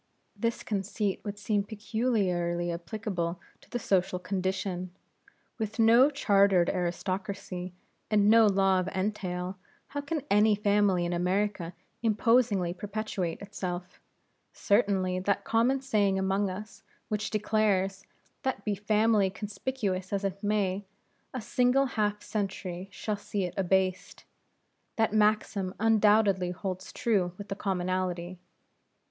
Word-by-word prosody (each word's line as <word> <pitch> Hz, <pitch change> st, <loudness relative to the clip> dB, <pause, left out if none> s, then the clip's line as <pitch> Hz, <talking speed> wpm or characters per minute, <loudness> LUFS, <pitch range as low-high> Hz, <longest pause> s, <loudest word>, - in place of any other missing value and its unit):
This 230 Hz, +3 st, -2 dB
conceit 200 Hz, -1 st, -2 dB
would 205 Hz, -1 st, -5 dB
seem 205 Hz, 0 st, 0 dB
peculiarly 195 Hz, -6 st, -1 dB
applicable 175 Hz, -1 st, -3 dB, 0.2 s
to -, -, -22 dB
the 245 Hz, -, -2 dB
social 190 Hz, -5 st, +1 dB
condition. 185 Hz, -1 st, -2 dB, 0.7 s
With 220 Hz, 0 st, -3 dB
no 230 Hz, +4 st, +6 dB
chartered 200 Hz, -9 st, +3 dB
aristocracy, 185 Hz, 0 st, -3 dB, 0.4 s
and 205 Hz, -1 st, +4 dB
no 225 Hz, 0 st, +7 dB
law 195 Hz, -1 st, +3 dB
of 185 Hz, -, -2 dB
entail, 185 Hz, -1 st, -3 dB, 0.3 s
how 285 Hz, -, -3 dB
can 285 Hz, 0 st, -3 dB
any 210 Hz, +1 st, +5 dB
family 200 Hz, -3 st, +2 dB
in 175 Hz, -, -1 dB
America 180 Hz, 0 st, -1 dB, 0.3 s
imposingly 220 Hz, -5 st, +2 dB
perpetuate 200 Hz, -3 st, -4 dB
itself? 180 Hz, -3 st, -6 dB, 0.5 s
Certainly 195 Hz, -3 st, +1 dB
that 200 Hz, +2 st, 0 dB
common 245 Hz, +4 st, +2 dB
saying 205 Hz, -7 st, +2 dB
among 190 Hz, +1 st, +1 dB
us, 210 Hz, +4 st, -8 dB, 0.3 s
which 210 Hz, 0 st, -1 dB
declares, 205 Hz, -3 st, +1 dB, 0.4 s
that 265 Hz, -7 st, -2 dB
be 210 Hz, -, 0 dB
a -, -, 0 dB
family 210 Hz, -1 st, +3 dB
conspicuous 200 Hz, -2 st, -3 dB
as 200 Hz, 0 st, -1 dB
it 195 Hz, 0 st, -3 dB
may, 205 Hz, -2 st, 0 dB, 0.5 s
a 255 Hz, -, -4 dB
single 250 Hz, +4 st, +2 dB
half 210 Hz, -4 st, -1 dB
century 190 Hz, -3 st, -4 dB
shall 210 Hz, -2 st, -3 dB
see 205 Hz, 0 st, -3 dB
it 180 Hz, -1 st, -3 dB
abased; 190 Hz, -1 st, 0 dB, 0.7 s
that 225 Hz, -1 st, +1 dB
maxim 210 Hz, -3 st, +1 dB
undoubtedly 210 Hz, -4 st, +4 dB
holds 185 Hz, +1 st, -5 dB
true 190 Hz, -7 st, 0 dB
with 205 Hz, 0 st, -9 dB
the 195 Hz, -, -2 dB
commonalty. 185 Hz, -2 st, -2 dB
200 Hz, 125 wpm, -29 LUFS, 185-215 Hz, 0.7 s, no